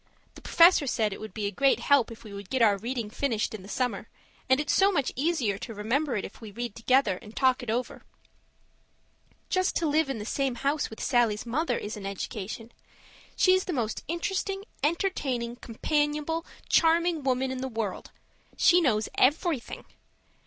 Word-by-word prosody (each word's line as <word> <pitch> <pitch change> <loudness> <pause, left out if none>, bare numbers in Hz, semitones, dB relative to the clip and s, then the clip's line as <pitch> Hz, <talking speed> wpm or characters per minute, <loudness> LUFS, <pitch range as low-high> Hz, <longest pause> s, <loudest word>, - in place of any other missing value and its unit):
The - - -14
Professor 335 -4 +5
said 215 -4 0
it - - -8
would 215 - -7
be 210 +1 -4
a 200 - -1
great 275 +6 +3
help 280 -5 +3
if 230 0 -11
we 215 -3 -10
would 200 -1 -9
get 260 -3 +2
our 210 -3 +5
reading 230 +1 -4
finished 225 -4 -1
in 215 - -6
the 190 - -12
summer; 225 -2 -2 0.4
and 260 +1 +5
it's 300 - 0
so 390 +1 +5
much 280 -9 0
easier 260 - 0
to 225 - -7
remember 245 +6 0
it 205 - -2
if - - -12
we 220 - -8
read 235 +2 -5
together 230 -4 +2
and 220 -1 -13
talk 260 -1 +3
it 245 - -7
over. 240 +3 -2 1.5
Just 370 0 0
to 335 - 0
live 305 0 +2
in 270 - -2
the 210 - -6
same 270 +1 -1
house 280 +4 -1
with 220 - -8
Sallie's 235 -4 +2
mother 290 +8 0
is 210 +1 -5
an 195 -1 -6
education. 215 +3 -6 0.6
She's 370 0 +4
the 360 - -3
most 230 -6 -2
interesting, 385 +3 -2 0.2
entertaining, 275 -8 -1
companionable, 295 +6 -1 0.2
charming 335 0 +3
woman 260 -1 0
in 260 - -4
the 265 - -2
world; 225 -5 -4 0.5
she 355 0 +5
knows 220 -8 +1
everything. 295 -1 +1
255 Hz, 180 wpm, -27 LUFS, 220-300 Hz, 1.5 s, Professor